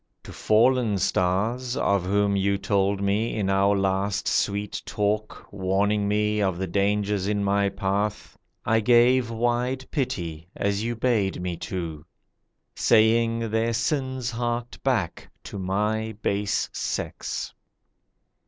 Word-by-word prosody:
To - - -10
fallen 115 -1 +3
stars 110 +9 0
(Of 100 -8 +1
whom 100 +1 +2
you 100 0 +1
told 100 0 0
me 105 +4 0
in 100 -3 0
our 100 +1 +3
last 95 +1 0
sweet 100 0 0
talk, 105 +1 -2
Warning 100 +2 +1
me 105 0 +1
of 95 -3 0
the 95 - -2
dangers 100 +1 0
in 105 -1 0
my 100 0 +2
path) 100 +2 -2 0.3
I 110 0 +3
gave 120 +2 +4
wide 120 +3 -1
pity 85 - -3
as 100 +1 -1
you 120 +1 -2
bade 110 -5 0
me 90 -1 -3
to, 80 -5 -5 0.7
Saying 115 0 +3
their 115 +1 +1
sins 130 -1 -1
harked 120 0 -3
back 115 -11 -1
to 100 - -7
my 105 +4 -1
base 100 0 0
sex. - - -4
105 Hz, 125 wpm, -25 LUFS, 100-115 Hz, 0.7 s, gave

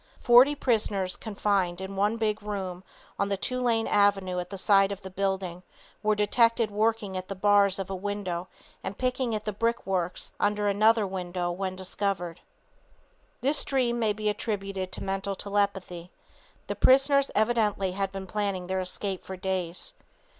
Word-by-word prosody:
Forty 250 +4 +6
prisoners 210 -8 +1
confined 200 -4 -1
in 190 +1 -6
one 205 +3 +1
big 215 -1 -1
room, 190 -3 -5 0.4
on 200 - +1
the 200 - 0
Tulane 235 0 0
avenue 195 -3 +2
side 195 0 +4
of 200 -1 -6
the 190 - -8
building, 190 -2 -2 0.4
were 215 0 +2
detected 230 +1 +3
working 215 -2 0
at 185 0 -4
the 195 - -5
bars 200 0 +4
of 195 -1 -4
a - - -2
window 185 -2 -3 0.4
and 195 - -5
picking 250 -2 0
at 215 - -5
brickworks 195 -6 -1
under 205 0 +1
another 215 +2 +4
window 180 -2 -3
when 185 +1 -3
discovered. 185 -2 -3 1.0
This 280 +3 +1
dream 245 -3 0
may 220 -2 +2
be 215 +1 -3
attributed 195 -3 -2
to - - -5
mental 195 0 -2
telepathy. 195 -4 -2 0.6
The - - -4
prisoners 275 +1 +5
evidently 215 -3 +2
have 195 +1 -2
been 195 0 -6
planning 200 -2 -2
their 190 +1 -1
escape 185 +1 -3
for 190 - -7
days. 185 - -3
200 Hz, 150 wpm, -27 LUFS, 190-215 Hz, 1.0 s, Forty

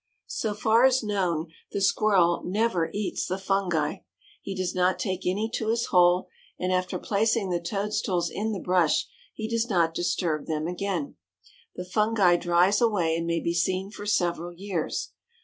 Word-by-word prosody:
So 215 -2 -3
far 220 +3 +3
as 260 -1 +4
known, 180 -6 -1 0.2
the - - -1
Squirrel 195 -3 +3
never 190 -3 0
eats 205 -1 -2
the 185 - -2
fungi. 190 -4 0 0.4
He 195 - -5
does 185 -1 -2
not 185 0 +2
take 190 -6 -3
any 205 +4 0
to 220 - -2
his 230 +1 +1
hole, 180 0 +4 0.3
and 185 0 -1
after 185 0 -1
placing 215 -1 0
the 175 -1 0
toadstools 195 -2 -1
in 220 +2 -2
the 200 - -3
brush 180 -4 +2 0.2
he 220 - -5
does 230 +1 -1
not 170 -5 +2
disturb 165 -2 -1
them 155 -1 -2
again. 180 - -3 0.6
The 180 - -5
fungi 205 -1 +3
dries 175 +5 +3
away 190 -9 +2
and 165 0 -2
may 170 -1 0
be 170 - -1
seen 185 +3 0
for 205 0 -8
several 175 -3 0
years. 185 -3 -3
185 Hz, 165 wpm, -26 LUFS, 175-210 Hz, 0.6 s, as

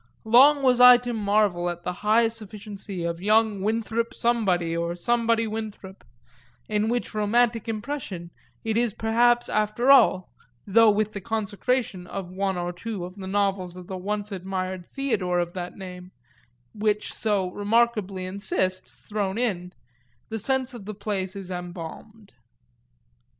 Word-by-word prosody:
Long 275 +6 +6
was 250 -2 +4
I 250 0 +10
to 245 0 -4
marvel 200 -5 +1
at 175 0 -6
the 180 - -2
high 220 +2 +4
sufficiency 210 -4 -7
of 170 0 -3
young 215 0 +3
Winthrop 225 +2 -1
Somebody 190 -9 +1
or 170 +1 -2
Somebody 230 +4 +1
Winthrop 215 -3 -7 0.6
in 210 +1 0
which 240 0 -2
romantic 230 +2 +1
impression 210 -7 -5 0.3
it 225 0 -1
is 235 -3 0
perhaps 240 +2 +3
after 215 +5 +2
all 185 -9 +5 0.3
(though 225 +2 +5
with 210 +1 +1
the 200 - -5
consecration 220 -2 -2
of 185 -2 -6
one 190 0 -1
or 175 0 -3
two 200 0 -5
of 180 - -9
the 190 -2 -7
novels 195 -2 -1
of 180 - -9
the 190 - -6
once 205 +3 -3
admired 185 -1 -4
Theodore 215 -10 -1
of 175 0 -1
that 180 -1 -6
name, 180 -2 -9 0.6
which 210 0 -1
so 200 -4 0
remarkably 205 -2 +1
insists, 185 -1 -3
thrown 205 -2 -2
in) 185 -7 -1 0.6
the 225 - -3
sense 260 +3 0
of 230 -5 -9
the 215 0 -6
place 200 -2 -3
is 190 -2 -7
embalmed. 180 +4 -8
205 Hz, 145 wpm, -25 LUFS, 185-225 Hz, 0.6 s, I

